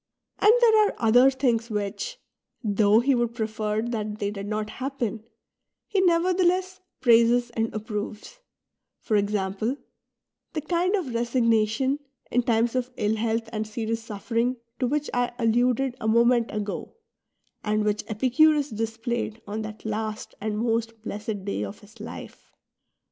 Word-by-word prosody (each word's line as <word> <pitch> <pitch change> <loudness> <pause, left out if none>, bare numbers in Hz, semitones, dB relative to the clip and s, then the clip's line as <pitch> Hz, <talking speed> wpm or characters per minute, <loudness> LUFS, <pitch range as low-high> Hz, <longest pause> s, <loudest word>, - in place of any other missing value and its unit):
And 420 - +7
there 440 -3 +6
are - - -4
other 245 +4 +6
things 250 -4 0
which, 210 - -3 0.5
though 210 +1 +4
he 275 +3 +3
would 240 -2 0
prefer 220 -1 -1
that 215 -3 -3
they 205 -1 -2
did 200 -1 -6
not 215 0 -2
happen, 255 -5 -3 0.6
he 395 -2 +1
nevertheless 365 +1 +2 0.2
praises 240 0 +4
and 225 -1 -1
approves, 215 - -5 0.3
— - - -58
for 215 - 0
example, 205 +4 0 0.8
the 310 - -2
kind 350 +5 +1
of 320 - -3
resignation, 235 +2 +1 0.3
in 245 - +3
times 230 0 +1
of 255 -1 -1
ill 210 +1 +1
health 225 +1 -1
and 215 0 -2
serious 225 +1 -3
suffering, 230 +3 -1 0.2
to 255 - +1
which 295 +3 -1
I 245 0 0
alluded 245 +2 +2
a 220 - -1
moment 235 +1 +4
ago, 210 -1 -4 0.7
and 215 0 +1
which 210 0 0
Epicurus 275 +6 +3
displayed 225 +1 -3
on 210 +2 -4
that 215 0 -8
last 215 0 -3
and 210 0 -2
most 230 0 -1
blessed 210 -2 -5
day 200 - -2
of 100 0 -7
his 215 +2 -17
life. 220 - -9
230 Hz, 145 wpm, -26 LUFS, 215-255 Hz, 0.8 s, And